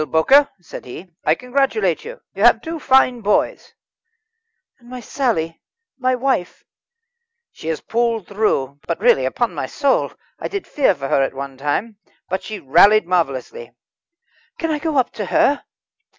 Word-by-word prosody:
"Well, 155 - -2
Bowker," 265 - +4
said 175 - -10
he, 170 +9 -10
"I - - +3
congratulate 275 - 0
you; - - -9
you - - -6
have - - +5
two 325 0 -5
fine 260 -3 +3
boys." 210 0 0 1.1
"And 240 -1 -18
my 255 0 -7
Sally 220 - -2 0.4
my 255 0 +1
wife?" 250 -8 -2 0.9
"She 160 - -11
has 160 -1 -2
pulled 230 -3 -1
through. 145 -10 -1
But 170 - -2
really, 210 - +4
upon 215 - -1
my 145 -4 -4
soul, 280 - 0 0.3
I - - -3
did 400 -2 -5
fear 270 -10 +2
for 135 -3 -5
her 135 - +2
at 135 - -1
one 135 0 -6
time. 150 - -2 0.3
But 190 +1 -2
she 215 -2 -7
rallied 200 +7 +5
marvellously." 175 - -2 0.8
"Can 325 -1 -2
I 300 - -1
go 310 -1 -2
up 255 - +2
to 210 - -5
her?" 285 +9 +2
220 Hz, 165 wpm, -20 LUFS, 160-265 Hz, 1.1 s, have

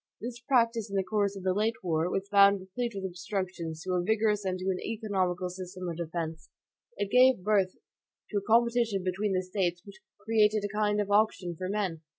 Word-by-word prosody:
This 240 +1 -6
practice 235 -4 +1
in 200 - -5
the 195 - +2
course 200 0 0
of 195 - -8
the 185 -1 +2
late 215 +3 +1
war, 165 -1 0
was 195 +1 -2
found 200 0 +6
replete 225 +6 -4
with 195 -1 -4
obstructions 180 -3 -4
to 185 - -3
a 180 - +2
vigorous 215 0 +1
and 185 -1 -1
to 185 - -6
an 185 - -3
economical 190 -5 -1
system 180 0 -7
of 170 -2 -4
defense. 165 -1 -5 0.5
It 205 - -2
gave 255 -5 +5
birth 195 -3 +2 0.6
to 210 - 0
a - - +1
competition 230 -1 +2
between 190 +2 -1
the 185 0 0
States 180 -1 -2
which 200 -2 -13 0.2
created 215 0 +2
a 205 +1 -5
kind 210 -1 +1
of 205 -1 -1
auction 200 -4 +2
for 185 +3 -4
men. 195 -6 -2
195 Hz, 200 wpm, -29 LUFS, 185-215 Hz, 0.6 s, found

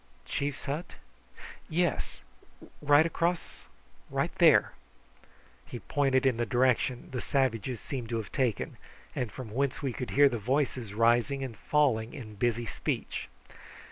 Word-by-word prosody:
"Chief's 140 -1 -3
hut? 150 +5 -4 0.7
Yes: 170 -2 -1 0.6
right 145 +2 +5
across. 170 +1 -2 0.7
There." - - +6 1.0
He - - -6
pointed 135 0 +1
in 130 -3 +3
the 120 - 0
direction 125 0 +1
the 125 -2 -3
savages 125 -3 0
seemed 125 -2 -5
to 115 - -1
have 110 - -5
taken, 125 -6 -1 0.4
and 120 -4 -2
from 125 -5 -8
whence 135 +4 -1
we 135 -3 -1
could 125 - -5
hear 145 +1 +6
the 120 -4 -1
voices 125 -2 -1
rising 120 +4 +3
and 125 -4 -5
falling 120 -4 +1
in 110 -5 -8
busy 120 +3 0
speech. - - -3
130 Hz, 135 wpm, -29 LUFS, 115-140 Hz, 1.0 s, There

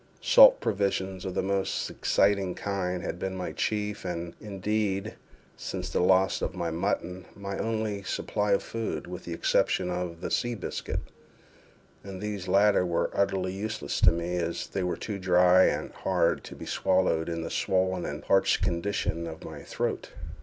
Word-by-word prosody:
Salt - - +8
provisions 95 -2 -1
of 95 - -4
the - - 0
most 95 0 -1
exciting 100 -2 +1
kind 90 -3 -2
had 85 - -4
been 95 0 -3
my 90 -1 -4
chief, 105 -1 -2
and, 85 -2 -4
indeed, 100 -1 -2 0.4
since - - -5
the - - +1
loss 95 +1 +3
of - - -2
the 85 -3 -2
mutton, 90 +2 -2
my 100 0 -5
only 110 -2 -1
supply 105 +2 -1
of 100 - +3
food, 115 -1 -4
with 90 +1 -8
the 85 - -4
exception 90 +1 +1
of 90 -2 -3
the - - -4
sea 120 0 0
biscuit; 100 - -4 1.0
and 95 -1 -7
these 105 -2 -4
latter 100 +1 +4
were 85 -2 0
utterly 95 -2 0
useless 105 -6 -3
to - - +7
me, 85 +1 -2
as 85 0 -2
they 95 - -3
were 90 -1 -1
too 105 -3 -5
dry 90 0 +5
and - - -1
hard - - 0
to - - -9
be - - -9
swallowed 90 -3 +1
in 85 -1 -3
the - - -5
swollen 95 -1 +1
and 75 +2 -5
parched 95 0 +3
condition 85 -2 -1
of 80 -1 -8
my - - -8
throat. - - -3
95 Hz, 170 wpm, -28 LUFS, 90-100 Hz, 1.0 s, Salt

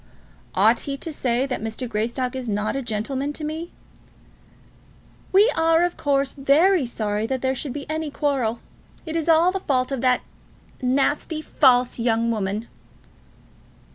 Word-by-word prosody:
"Ought - - +4
he 280 -2 -4
to 320 +3 -3
say 250 -2 0
that 260 -5 -4
Mr. 225 +3 -4
Greystock 235 +4 -2
is 255 -3 -4
not 210 +3 -1
a 275 - -1
gentleman 260 +5 -3
to 305 - -8
me?" 320 +3 -4 1.6
"We 400 +3 +6
are, 325 +1 +3
of 350 0 0
course, 275 -2 0
very 295 +3 +3
sorry 215 -2 -2
that 260 0 -3
there 260 0 +2
should 270 +1 -4
be 285 +2 -6
any 310 0 -3
quarrel. 265 -6 -1 0.4
It 320 -1 -5
is 330 0 -1
all 330 +3 +5
the 385 - -2
fault 255 -6 0
of 270 -3 -2
that 255 -1 +3 0.6
nasty, 280 +5 0
false 250 -5 +3
young 230 0 +1
woman." 210 +1 -2
265 Hz, 155 wpm, -23 LUFS, 235-305 Hz, 1.6 s, We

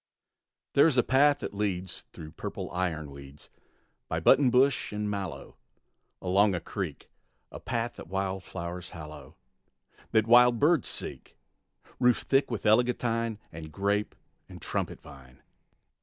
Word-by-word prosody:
There 140 - +6
is 140 -5 +1
a 125 - +5
path 145 +3 +4
that - - -5
leads 95 -4 -3
Through 80 -1 -10
purple 80 - -6
iron 85 -5 -2
weeds, 70 +1 -13 0.6
By 80 - -2
button 130 - +5
bush 130 +3 +2
and 105 0 -3
mallow 100 -3 -5 0.7
Along 95 +2 +3
a - - -1
creek; - - -6 0.4
A - - -8
path 120 0 -3
that - - -9
wildflowers 95 -2 -4
hallow, 75 -2 -10 0.7
That 110 -1 +3
wild 120 +1 +6
birds 150 +1 +3
seek; - - -6 0.6
Roofed 125 -1 +3
thick 135 +1 +2
with 115 -4 -4
eglantine 115 0 +2
And 80 -1 -9
grape 100 +5 -1 0.3
and - - -10
trumpet - - -3
vine. 65 -2 -15
100 Hz, 135 wpm, -28 LUFS, 85-120 Hz, 0.7 s, There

